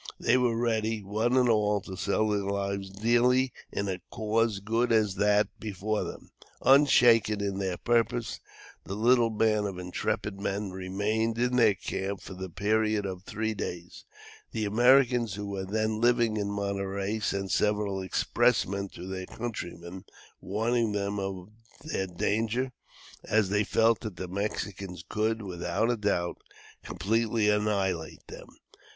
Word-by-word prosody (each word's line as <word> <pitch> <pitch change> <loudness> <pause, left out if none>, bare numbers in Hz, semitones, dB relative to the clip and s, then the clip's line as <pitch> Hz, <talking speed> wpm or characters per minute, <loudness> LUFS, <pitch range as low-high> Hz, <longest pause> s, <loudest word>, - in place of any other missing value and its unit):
They 115 - +3
were 125 -3 +2
ready, 110 -2 0
one 110 +6 0
and 125 -1 +4
all, 105 -2 +2
to 95 - -8
sell 100 +3 0
their 105 -1 +1
lives 100 0 -2
dearly 120 +5 +2 0.2
in 100 - -2
a 95 -2 -3
cause 110 -1 0
good 115 +4 0
as 110 -3 +3
that 105 +1 +3
before 105 0 -2
them. - - -9 0.3
Unshaken 120 -6 +5
in 100 -1 -2
their 95 -2 -2
purpose, 120 0 0 0.4
the 95 - -5
little 120 +2 +4
band 110 -1 +1
of 95 -2 -6
intrepid 90 +2 -3
men 100 -1 -2
remained 100 +5 -1
in 125 +1 +1
their 115 -5 +5
camp 95 +2 -4
for - - -9
the 95 0 -6
period 105 +3 +1
of 95 -2 -5
three 110 +1 -2
days. 90 -4 -6 0.5
The 110 -1 -1
Americans 120 0 +4
who 105 0 -5
were 100 -1 -4
then 110 +2 -1
living 120 -2 +3
at 100 - -1
Monterey 100 +1 -2
sent 100 -3 -2
several 105 +1 +1
expressmen 100 +1 +1
to 90 - -8
their 95 -1 -5
countrymen, 90 -6 -6 0.3
warning 110 +2 0
them 100 0 -2
of 95 0 -5 0.3
their 145 -11 -2
danger, 110 +8 -1 0.5
as 110 -3 +2
they 105 +1 +2
felt 115 +1 +3
that 110 -5 -6
the 90 +2 -5
Mexicans 95 -2 -4
could, 110 +1 -1
without 95 +4 -1
a - - +1
doubt, 95 -5 -1 0.4
completely 110 0 0
annihilate 100 -6 -1
them. - - -11
105 Hz, 145 wpm, -28 LUFS, 95-115 Hz, 0.5 s, Unshaken